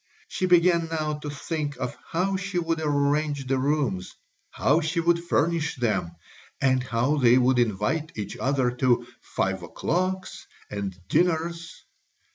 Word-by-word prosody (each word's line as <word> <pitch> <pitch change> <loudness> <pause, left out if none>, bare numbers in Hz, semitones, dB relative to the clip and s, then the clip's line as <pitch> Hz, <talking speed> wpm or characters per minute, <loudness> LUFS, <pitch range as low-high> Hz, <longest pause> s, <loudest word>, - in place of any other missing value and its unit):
She 185 - -1
began 170 -1 +4
now 155 -2 -2
to 150 - -6
think 145 +1 -4
of - - -4
how 190 +4 0
she 190 0 -3
would 165 -2 0
arrange 145 -1 +1
the 130 0 0
rooms, 135 -9 -1 0.3
how 150 +5 +2
she 160 +2 -1
would 170 0 +2
furnish 165 -2 +1
them, 105 -9 -1 0.5
and 130 -1 +3
how 125 +4 0
they 125 -2 +5
would 130 0 +3
invite 120 +9 0
each 105 - -4
other 130 -2 +1
to 125 -2 +2 0.2
"five 95 -1 -2
o'clocks" 185 - -2 0.2
and 100 -3 -4
dinners. 170 - 0
150 Hz, 140 wpm, -26 LUFS, 125-165 Hz, 0.5 s, they